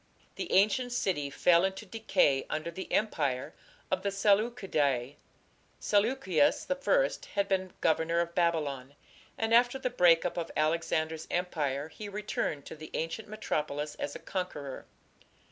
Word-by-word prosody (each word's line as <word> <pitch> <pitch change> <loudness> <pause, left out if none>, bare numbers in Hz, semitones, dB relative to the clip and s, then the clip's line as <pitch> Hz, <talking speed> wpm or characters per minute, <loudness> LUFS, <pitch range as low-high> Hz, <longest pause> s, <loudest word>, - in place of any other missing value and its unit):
The - - -5
ancient 215 +6 +3
city 160 -11 0
fell 170 +4 +4
into 190 +3 -2
decay 185 -10 +1
under 155 +2 -3
the 185 +3 -7
empire 145 -12 0 0.4
of - - +1
the 200 - 0
Seleucidae. 195 - +1 0.6
Seleucus 205 - +2
I - - +3 0.3
had 200 -1 +1
been 190 -1 0
governor 165 +1 +2
of 170 0 -1
Babylon, 145 -6 0 0.4
and 225 0 0
after 245 +2 +5
the 255 -1 -2
break 175 -7 +5
up 180 - -2
of 170 -1 -2
Alexander's 160 0 0
empire 150 -5 -1
he 205 +4 -8
returned 200 -8 -3
to - - -8
the 155 0 -10
ancient 165 +7 -3
metropolis 150 -8 -3
as 145 - -3
a - - -3
conqueror. 150 -8 -5
170 Hz, 140 wpm, -30 LUFS, 155-210 Hz, 0.6 s, after